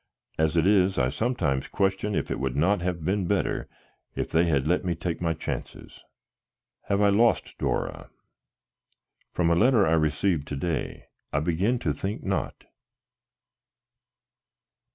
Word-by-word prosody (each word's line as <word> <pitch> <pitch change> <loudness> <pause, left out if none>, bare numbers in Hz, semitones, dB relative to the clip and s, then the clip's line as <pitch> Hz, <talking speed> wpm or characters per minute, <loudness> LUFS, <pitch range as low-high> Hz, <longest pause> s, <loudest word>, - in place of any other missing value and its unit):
As 80 +1 +2
it 80 - +3
is, 95 -1 +3
I 65 -2 +2
sometimes 90 - -1
question 95 +1 0
if - - -2
it - - -2
would 65 -2 -2
not 90 +5 +2
have 85 -3 -3
been 95 0 0
better - - -1 0.5
if - - -3
they 80 +2 +3
had 70 -5 +1
let 90 +2 +1
me 90 -2 -1
take 85 +1 -4
my 85 -1 0
chances. 80 - -6 0.9
Have 100 0 +1
I 100 - +5
lost 115 +4 +2
Dora? - - -2 1.2
From 85 -1 +1
a - - +4
letter 110 +2 +4
I 80 - +2
received 80 +1 +1
to 75 - -4
day 80 +1 -3 0.3
I - - +1
begin 90 +10 +1
to 75 -10 -1
think 95 +8 -4
not. - - -3
85 Hz, 150 wpm, -26 LUFS, 80-100 Hz, 1.2 s, I